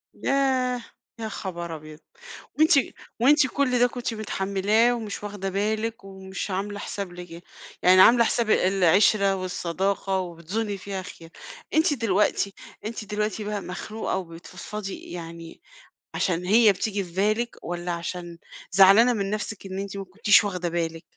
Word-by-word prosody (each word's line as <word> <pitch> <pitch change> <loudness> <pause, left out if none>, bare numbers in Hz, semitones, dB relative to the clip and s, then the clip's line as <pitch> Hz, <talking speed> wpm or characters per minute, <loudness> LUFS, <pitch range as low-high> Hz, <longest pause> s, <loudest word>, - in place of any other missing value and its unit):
ياه! 260 -2 +1 0.4
يا 220 -1 -4
خبر 175 -5 -5
أبيض! 155 0 -11 0.6
وأنتِ 315 +1 +5 0.5
وأنتِ 285 +3 +5
كل 255 -1 0
ده 245 - +5
كنتِ 245 -1 -4
متحملاه 210 +2 +1
ومش 220 -4 -5
واخدة 205 -2 -4
بالِك، 220 +3 -2
ومش 190 0 -7
عاملة 200 +2 -3
حساب 200 -2 -5
لك 175 -1 -10 0.4
يعني 185 +1 +7
عاملة 235 +4 +7
حساب 230 -1 0
العشرة 195 +2 +4
والصداقة 190 +1 -2
وبتظني 185 +4 -4
فيها 195 0 -5
خير، 165 -2 -12 0.4
أنتِ 315 -1 +3
دلوقتي 210 -4 +1 0.3
أنتِ 220 0 -5
دلوقتي 210 +1 -2
بقى 210 0 -3
مخنوقة 205 +4 -4
وبتفضفضي 180 +3 -7
يعني 165 -1 -9 0.6
عشان 180 -2 0
هي 215 +3 +6
بتيجي 200 +1 -2
في 175 - -12
بالِك، 215 +5 0
والّا 175 0 -4
عشان 170 0 -5 0.3
زعلانة 195 +6 +7
من 200 -3 -2
نفسِك 210 -1 -4
إن 190 0 -5
أنتِ 200 0 -5
ما 195 - -4
كنتيش 205 +3 +4
واخدة 180 -4 -2
بالِك؟ 165 -1 -3
200 Hz, 140 wpm, -25 LUFS, 180-220 Hz, 0.6 s, يعني